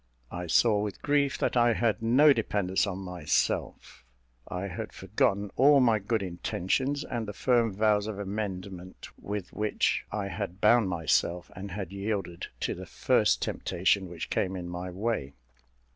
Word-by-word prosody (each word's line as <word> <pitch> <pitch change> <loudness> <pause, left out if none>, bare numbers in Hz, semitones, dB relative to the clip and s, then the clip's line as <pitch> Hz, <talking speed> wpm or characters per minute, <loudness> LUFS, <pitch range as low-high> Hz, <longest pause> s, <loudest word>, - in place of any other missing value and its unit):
I 90 0 -5
saw, 105 +4 +4
with 105 -2 -5
grief, 145 -2 +2
that - - -1
I 120 -1 +4
had 115 -1 0
no 135 +6 +6
dependence 100 -5 0
on 95 -2 -3
myself; 90 -8 -2 0.4
I 90 +1 -4
had 110 +3 -6
forgotten 100 +1 0
all 140 +2 +6
my 115 -4 +4
good 105 +1 -1
intentions, 95 - -1
and 115 -3 -4
the 105 - -5
firm 120 -2 +2
vows 105 +1 +2
of 110 -2 -4
amendment 95 -3 -5
with 100 -2 -6
which 105 0 0
I 105 -2 -3
had 90 +1 -5
bound 110 -1 +4
myself, 85 +1 0
and 100 +2 -7
had 95 -1 -5
yielded 100 -4 -3
to - - -1
the - - -9
first - - +2
temptation 95 +1 0
which 85 -1 -7
came 95 +1 0
in 90 -1 -5
my 90 +1 -5
way. 95 -7 -3
100 Hz, 160 wpm, -28 LUFS, 90-115 Hz, 0.4 s, no